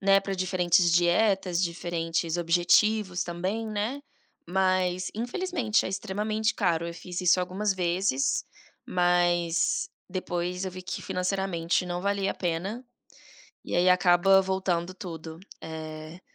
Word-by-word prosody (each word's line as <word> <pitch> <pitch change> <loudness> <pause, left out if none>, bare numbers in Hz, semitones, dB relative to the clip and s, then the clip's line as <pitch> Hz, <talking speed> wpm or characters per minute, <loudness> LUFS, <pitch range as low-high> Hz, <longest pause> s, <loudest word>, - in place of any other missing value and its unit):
né, 195 0 +5
para 195 0 -4
diferentes 180 -1 +2
dietas, 180 +1 +2
diferentes 170 -1 -2
objetivos 180 +3 +2
também, 185 +6 -3
né. 215 +6 -2 0.5
Mas 185 0 +1
infelizmente 245 - 0
é - - -2
extremamente 210 +3 -1
caro, 170 -4 0
eu 170 - -6
fiz 180 +1 -6
isso 180 0 +4
algumas 195 +3 -1
vezes, 175 -6 0 0.4
mas 175 -1 +1 0.2
depois 180 0 -3
eu 190 - -3
vi 185 0 -9
que 180 - -5
financeiramente 185 -2 -1
não 175 0 -3
valia 200 0 0
a - - -4
pena, 190 +8 -3 0.8
e - - -5
aí 175 +1 +4
acaba 180 +1 +5
voltando 185 -2 -1
tudo. 165 -3 -8 0.2
Eh 155 +1 -8
180 Hz, 125 wpm, -27 LUFS, 175-195 Hz, 0.8 s, né